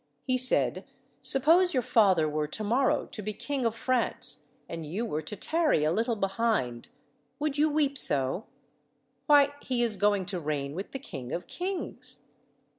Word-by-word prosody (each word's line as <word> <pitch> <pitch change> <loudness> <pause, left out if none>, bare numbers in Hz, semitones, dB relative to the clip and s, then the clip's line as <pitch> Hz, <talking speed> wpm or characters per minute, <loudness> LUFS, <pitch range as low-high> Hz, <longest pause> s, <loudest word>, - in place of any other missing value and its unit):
He 255 - 0
said, 255 0 +2 0.4
"Suppose 330 +6 +4
your 255 - +2
father 190 -9 +3
were 150 0 -1
to 215 +8 -4
morrow 245 +5 +1
to 215 - -6
be 210 +1 -4
King 270 +2 -2
of 225 - -3
France, 250 +1 -1 0.2
and 165 -1 -6
you 185 +10 -3
were 155 -8 -3
to 155 +7 -7
tarry 315 - +1
a 155 - +2
little 230 +6 0
behind, 195 - -1 0.5
would 295 -1 -2
you 310 +1 +4
weep 290 -2 +1
so? 140 - +2 0.8
Why, 285 -1 +5
he 250 -2 -1
is 220 -4 0
going 205 -1 +2
to 180 -1 -3
reign 145 -3 -3
with 190 +5 -5
the - - -4
King 135 - -8
of 175 +1 -4
kings." 370 +1 -5
225 Hz, 170 wpm, -28 LUFS, 165-275 Hz, 0.8 s, Why